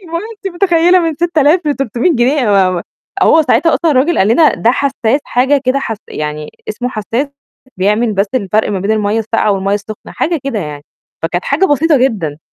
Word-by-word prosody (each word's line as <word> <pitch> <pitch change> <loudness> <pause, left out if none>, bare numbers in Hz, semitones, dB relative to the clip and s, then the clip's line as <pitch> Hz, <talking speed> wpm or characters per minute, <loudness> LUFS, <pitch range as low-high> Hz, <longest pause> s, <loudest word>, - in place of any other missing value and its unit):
اللي 340 -4 -14
هو - - -1
أنتِ 405 -1 -6
متخيلة؟ 350 -1 +3
من 330 -2 -1
6000 320 0 +2
ل300 275 - 0
جنيه 260 +4 +2
أنا 220 - +1
ما 195 -2 +3
ما 175 -2 -3 0.4
هو 320 - +5
ساعتها 285 +4 +2
أصلًا 330 -2 +1
الرجل 290 +5 +2
قال 195 - +3
لنا 300 +7 +4
ده 230 - +2
حساس 275 -1 0
حاجة 270 +3 +1
كده 255 +2 +1
حس 225 -5 -4
يعني 150 0 -5 0.2
اسمه 245 +4 -3
حساس 230 +4 -3 0.5
بيعمل 210 +4 +1
بس 195 +1 +1
الفرق 215 -2 0
ما 195 -2 -2
بين 200 +3 -2
المَيّة 215 0 0
الساقعة 220 -1 0
والمَيّة 195 +1 -1
السُخنة، 210 +1 -7
حاجة 330 -3 -1
كده 270 -6 -2
يعني. 150 -4 -6 0.4
فكانت 175 +2 -2
حاجة 300 +8 +1
بسيطة 300 0 +2
جدًا. 200 - -1
245 Hz, 195 wpm, -14 LUFS, 205-305 Hz, 0.5 s, هو